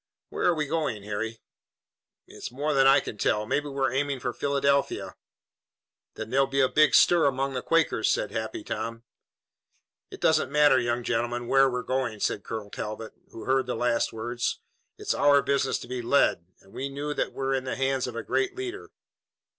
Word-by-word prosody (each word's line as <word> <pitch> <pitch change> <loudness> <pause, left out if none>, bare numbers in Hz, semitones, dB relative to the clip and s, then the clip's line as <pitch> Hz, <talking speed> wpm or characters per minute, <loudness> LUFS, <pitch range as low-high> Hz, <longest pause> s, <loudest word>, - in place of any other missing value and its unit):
"Where - - -1
are 175 - +3
we 155 -1 -1
going, 145 -9 -2
Harry?" 110 +2 -4 0.8
"It's - - -8
more 145 +4 -1
than 135 -1 +5
I 135 - +6
can 105 - -8
tell. 105 0 +1
Maybe 145 +6 -1
we're 135 -2 -1
aiming 140 0 -1
for 125 - -3
Philadelphia." 140 0 0 1.0
"Then 110 +1 -7
there'll 135 +1 +3
be 135 +1 -1
a 130 - +5
big 150 0 +4
stir 170 -4 +5
among 135 0 -1
the 125 - -2
Quakers," 165 -9 +1
said - - 0
Happy 110 -1 -4
Tom. 115 +2 -5 1.1
"It - - -10
doesn't 130 - +2
matter, 145 -2 +5
young 120 0 -1
gentlemen, 120 +1 -1
where 135 +1 +5
we're 125 -1 -3
going," 130 -5 -2
said 100 - -1
Colonel 105 -3 -6
Talbot, 110 +1 -6 0.2
who 115 - -10
heard 130 -1 +1
the 125 - -2
last 115 0 +1
words. 120 +2 -3 0.4
"It's - - -1
our 145 -1 +4
business 140 -1 +1
to - - -9
be 125 0 -4
led, 115 -8 +2
and 95 - -21
we 135 +1 -4
know 145 +2 -4
that - - -2
we're 135 0 -2
in 130 -1 -1
the 130 - -3
hands 135 -1 0
of 120 - -7
a 115 - -4
great 390 -2 -1
leader. 385 +1 -6
130 Hz, 190 wpm, -27 LUFS, 115-140 Hz, 1.1 s, I